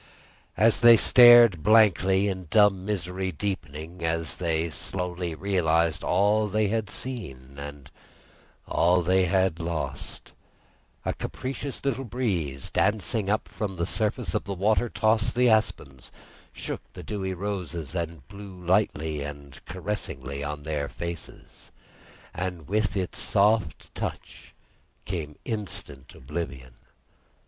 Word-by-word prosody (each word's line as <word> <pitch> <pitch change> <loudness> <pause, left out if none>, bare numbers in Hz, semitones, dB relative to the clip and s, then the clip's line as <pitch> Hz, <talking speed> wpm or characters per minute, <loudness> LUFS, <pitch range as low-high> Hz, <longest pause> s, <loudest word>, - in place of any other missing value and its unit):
As 110 +2 +4
they 120 -1 +8
stared 120 -7 +8
blankly 100 -2 +4
in 95 -3 -4
dumb 105 -2 +4
misery 95 -2 -2
deepening 85 -2 -5
as 80 0 -1
they 80 -2 -1
slowly 90 +1 -4
realised 85 -4 +1
all 105 +3 +2
they 105 0 +1
had 110 -2 -1
seen 70 - -6
and 70 -1 -9 0.8
all 90 +1 +3
they 95 +2 +3
had 95 -2 +1
lost, 80 -5 -4 0.7
a - - 0
capricious 135 +1 -5
little 135 -1 0
breeze, 95 - -2
dancing 105 0 0
up 105 +1 0
from 100 -3 -4
the 85 -1 -1
surface 105 -1 -2
of - - -1
the 100 - -4
water, 110 +5 +2
tossed 110 +1 +1
the 125 0 +4
aspens, 110 - 0 0.4
shook - - -5
the - - -9
dewy 95 -3 -3
roses 85 -6 -4
and 85 -6 -4
blew 100 0 -10
lightly 85 -5 0
and 70 -1 -8
caressingly 85 -8 -5
in 75 0 -5
their 75 -2 -2
faces; 85 -1 -8 0.6
and 90 -3 -4
with 100 -1 0
its 95 -2 -3
soft 105 -5 +1
touch - - -7 0.5
came 80 -6 -4
instant 100 - -5
oblivion. 65 -3 -6
90 Hz, 120 wpm, -26 LUFS, 80-105 Hz, 0.8 s, they